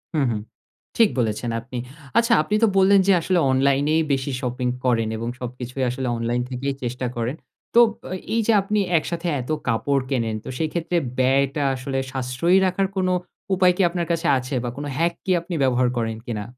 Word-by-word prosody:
হু, - - +2
হু, 110 - -1 0.6
ঠিক 225 -3 +6
বলেছেন 115 0 -1
আপনি। 125 +2 -8 0.4
আচ্ছা 230 0 +4
আপনি 210 - -1
তো - - +7
বললেন 195 +1 +6
যে - - +6
আসলে 180 +1 +1
অনলাইনেই 140 +4 +2
বেশি 135 0 0
শপিং 125 -1 -2 0.2
করেন 115 -3 +2
এবং 115 +1 -3
সবকিছুই 125 +1 -5
আসলে 125 +1 -3
অনলাইন 120 +1 -1
থেকেই 135 +2 -3
চেষ্টা 125 +1 -2
করেন। 120 +3 -2 0.4
তো 235 -1 +7 0.2
আ - - -2 0.2
এই 230 - +3
যে - - +5
আপনি 210 +2 0 0.2
একসাথে 165 +2 -3
এত 125 - -10 0.2
কাপড় 135 +4 +1
কেনেন, 115 -5 0
তো - - -8
সেইক্ষেত্রে 165 +3 -1 0.2
ব্যয়টা 135 +2 +2
আসলে 135 +1 -4
সাশ্রয়ী 130 +8 +1
রাখার 190 +1 +1
কোনো 185 -1 +1 0.4
উপায় 185 -1 +4
কি - - +2
আপনার 170 0 -2
কাছে 165 -1 0
আছে 130 +2 -4
বা 120 - -2
কোন 145 - -4
হ্যাক 170 +2 +2
কি 190 - 0
আপনি 170 +2 -7
ব্যবহার 125 -1 +3
করেন 115 -1 -1
কিনা? 110 -3 -3
135 Hz, 185 wpm, -23 LUFS, 125-175 Hz, 0.6 s, তো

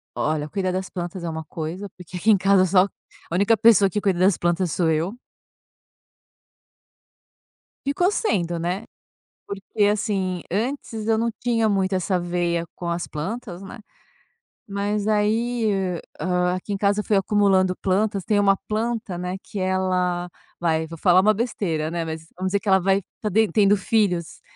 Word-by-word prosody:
Olha, 150 0 -1
cuidar 185 0 -1
das 185 0 -3
plantas 175 0 -5
é 170 - -2
uma 160 0 -5
coisa, 170 +6 -5
porque 180 0 -9
aqui 215 +5 +3
em 205 - +6
casa 195 0 +4
só 185 0 +5 0.5
a 170 - -2
única 205 +4 +4
pessoa 220 -3 +5
que 210 +2 -2
cuida 190 -4 +1
das 185 0 +4
plantas 175 0 0
sou 170 0 +1
eu. 160 +5 0 2.7
Ficou 355 +8 +2
sendo, 175 - 0
né, 180 +5 -2 0.6
porque 200 +1 -2
assim, 195 -4 0
antes 225 +1 -3
eu 225 - +4
não 230 +1 0
tinha 230 -2 +1
muito 190 -1 +1
essa 185 0 0
veia 175 -1 -1
com 175 - -7
as 170 0 -2
plantas, 185 +4 -5
né, 235 +5 -9 0.9
mas 205 +1 -2
aí, 220 +2 +1
hã 185 -3 -1 0.2
hã, 180 0 +1
aqui 190 +2 -4
em - - -1
casa 200 +1 +2
eu - - -1
fui 210 - +3
acumulando 195 -2 +3
plantas. 200 0 +1
Tem 210 -1 +2
uma 195 -1 +4
planta, 220 -3 -2
né, 180 +1 -3
que - - -9
ela 185 -1 0 0.3
vai, 160 -2 +1
vou 165 0 -9
falar 180 +2 +5
uma 215 +2 +4
besteira, 195 -9 -2
né, 170 -1 -2
mas 160 0 -6
vamos 185 0 -1
dizer 200 +1 +1
que 215 - -12
ela 190 0 +6
vai 195 +2 +2 0.2
tá 215 - -1
den 220 +1 +3
tendo 205 +2 +4
filhos, 185 -4 0
190 Hz, 170 wpm, -23 LUFS, 175-210 Hz, 2.7 s, em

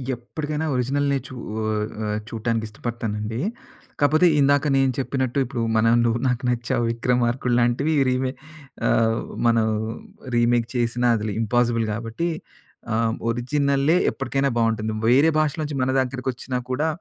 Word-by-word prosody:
ఎప్పటికైనా 150 +5 -4
ఒరిజినల్‌నే 140 +3 +1
చూ 130 - -10 0.7
ఆహ్, 105 0 -1
చూడటానికి 115 0 -2
ఇష్టపడతానండి. 110 0 -4 0.6
కాకపోతే 155 +5 +4
ఇందాక 140 +1 +3
నేను 135 -1 +3
చెప్పినట్టు 130 -1 -1
ఇప్పుడు 120 -1 -4 0.2
మనం 115 +1 +4
'నువ్వు 115 0 +1
నాకు 125 +1 -1
నచ్చావు, 120 0 0
విక్రమార్కుడు' 120 +1 0
లాంటివి 125 +6 +1 0.2
రీమే 130 0 0 0.6
ఆహ్, 115 0 +2 0.3
మనం 115 -1 +3 0.7
రీమేక్ 120 0 +2
చేసిన 120 0 0
అది 105 -1 -2
ఇంపాసిబుల్ 115 0 +1
కాబట్టి 115 +9 -3 0.7
ఆహ్, 115 0 +1
ఒరిజినలే 140 +6 +1
ఎప్పటికైనా 135 +1 -1
బావుంటుంది. 110 -1 0 0.2
వేరే 145 +6 +5
భాషలో 155 +1 0
నుంచి 145 -2 -4
మన 130 - +1
దగ్గరికొచ్చినా 130 0 -3
కూడా 150 +5 0
125 Hz, 125 wpm, -23 LUFS, 115-140 Hz, 0.7 s, వేరే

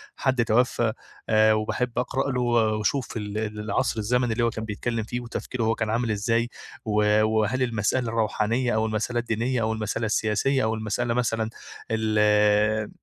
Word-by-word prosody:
حد 130 -3 +1
توفَّى، 115 -1 +2 0.4
آآ، 110 0 +5
وباحب 110 +3 -1
أقرَأ 135 +2 -1
له 125 - -1
و 115 -3 +2
وأشوف 125 +3 -1
ال 105 -1 -4
ال 105 -1 -3
العصر 105 +1 -1
الزمني 120 +2 +1
اللي 120 +1 0
هو 115 - +3
كان 110 -1 -5
بيتكلَّم 110 +2 -3
فيه، 120 +3 -4
وتفكيره 120 0 -4
هو 110 +1 +2
كان 110 -1 -2
عامل 115 +1 0
إزاي، 115 +3 0 0.4
و 105 0 +3
وهل 110 +4 +1
المسألة 115 +1 0
الروحانية 115 +2 0
أو 110 0 +1
المسألة 110 +2 -1
الدينية 120 +2 -1
أو 110 0 0
المسألة 110 +1 -2
السياسية 110 +5 +1
أو 110 - +1
المسألة 110 +2 -1
مثلًا 115 -2 0 0.4
ال 105 -1 +2
110 Hz, 165 wpm, -25 LUFS, 110-120 Hz, 0.4 s, آآ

